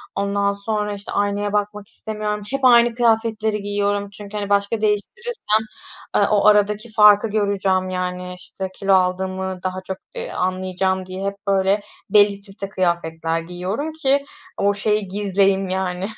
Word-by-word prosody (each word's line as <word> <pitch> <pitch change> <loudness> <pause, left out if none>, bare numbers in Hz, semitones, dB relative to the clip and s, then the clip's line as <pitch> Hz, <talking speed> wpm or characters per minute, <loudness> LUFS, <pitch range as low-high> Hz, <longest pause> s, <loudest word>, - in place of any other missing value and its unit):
ondan 200 0 0
sonra, 210 +1 -2
işte, 200 0 -8
aynaya 205 0 0
bakmak 210 0 -2
istemiyorum, 210 -2 -4
hep 275 -1 0
aynı 240 -1 +6
kıyafetleri 220 -2 +1
giyiyorum 205 0 -1
çünkü, 205 +1 -9
hani, 200 -1 -3
başka 200 +2 +1
değiştirirsem, 220 - 0 0.5
eee, - - +4
o 205 -1 +3
aradaki 210 +2 +3
farkı 210 0 +6
göreceğim, 195 -3 0
yani, 180 0 -3
işte, 190 +1 -6
kilo 195 -1 +2
aldığımı 185 0 0
daha 185 0 -3
çok, 190 0 -4 0.2
ııı, - - -5
anlayacağım 185 0 -1
diye 185 +1 -6
hep, 200 0 -2
böyle, 195 +1 +2 0.3
belli 205 -1 +4
tipte 195 0 -8
kıyafetler 165 -3 -1
giyiyorum 180 - -4
ki 280 -3 +1 0.3
o 200 0 +2
şeyi 210 0 0
gizleyeyim, 195 0 +1
yani, 185 0 -2
200 Hz, 145 wpm, -21 LUFS, 190-210 Hz, 0.5 s, aynı